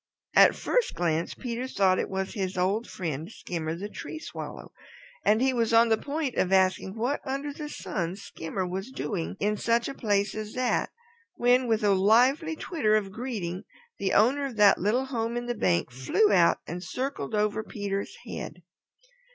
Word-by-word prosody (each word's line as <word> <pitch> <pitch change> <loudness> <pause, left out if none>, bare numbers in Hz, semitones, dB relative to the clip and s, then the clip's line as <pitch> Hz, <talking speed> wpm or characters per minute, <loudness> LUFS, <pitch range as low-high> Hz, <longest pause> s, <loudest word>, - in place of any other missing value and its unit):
At - - +7
first - - 0
glance 165 -1 -1
Peter 245 0 -4
thought 190 -6 +2
it - - -2
was 190 0 -3
his 190 -2 -3
old 195 +6 +1
friend, 160 +1 -4
Skimmer 165 -6 -4
the 195 +4 -5
Tree 265 - -7
Swallow, 310 - -8 0.5
and 215 +4 +3
he 265 0 +3
was 230 -2 +1
just 230 - +6
on 230 0 +4
the 220 - +4
point 290 -2 -2
of 185 - +1
asking 190 +1 +2
what 245 +6 -1
under 275 +1 -3
the 295 0 -6
sun 175 - -3
Skimmer 185 -1 -5
was 190 +6 -4
doing 195 -8 -4
in 210 +1 0
such 235 +2 +1
a - - -4
place 205 -5 0
as 215 0 -6
that, 250 -1 +1 0.5
when 245 +1 +3
with 225 -2 +1
a 205 -1 +4
lively 250 - +4
twitter 295 -10 +1
of 200 -2 0
greeting 200 -6 -4 0.4
the 190 -1 0
owner 265 +7 +4
of 255 - -8
that 205 -2 +6
little 230 +7 +1
hole 235 -3 -2
in 240 - -3
the 240 - -1
bank 85 - +1
flew 130 +12 +2
out 175 -4 +5
and 175 +2 -6
circled 220 - -3
over 210 +1 +1
Peter's 200 -2 -4
head. - - -7
215 Hz, 185 wpm, -27 LUFS, 190-245 Hz, 0.5 s, At